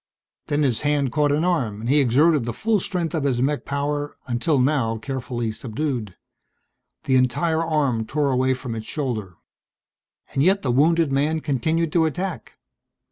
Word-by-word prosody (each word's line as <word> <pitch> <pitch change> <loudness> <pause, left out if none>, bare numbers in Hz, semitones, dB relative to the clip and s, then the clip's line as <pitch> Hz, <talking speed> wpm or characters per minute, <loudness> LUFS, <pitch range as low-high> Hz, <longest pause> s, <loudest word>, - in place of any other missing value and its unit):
Then 150 0 +1
his 125 -5 +1
hand 145 -3 +1
caught 145 +1 +2
an 150 +3 +1
arm 130 - 0
and 115 - -5
he 145 +4 +4
exerted 140 +3 +3
the 120 - -3
full 220 -1 +1
strength 175 -2 -3
of 160 -4 -1
his 130 -4 +1
mech 140 +3 0
power, 145 +1 -2
until 125 +5 0
now 125 -4 +1
carefully 125 -2 -3
subdued. 115 - -4 0.9
The 130 - +3
entire 160 +6 +1
arm 140 -9 0
tore 145 -1 0
away 130 0 +2
from 125 -2 -6
its 110 -1 -6
shoulder. 110 - -3 1.0
And 135 - +1
yet 190 +6 +3
the 130 - +1
wounded 160 +4 +3
man 150 +4 +1
continued 160 +3 -1
to 165 -2 +4
attack. 180 +3 -4
140 Hz, 165 wpm, -23 LUFS, 125-155 Hz, 1.0 s, he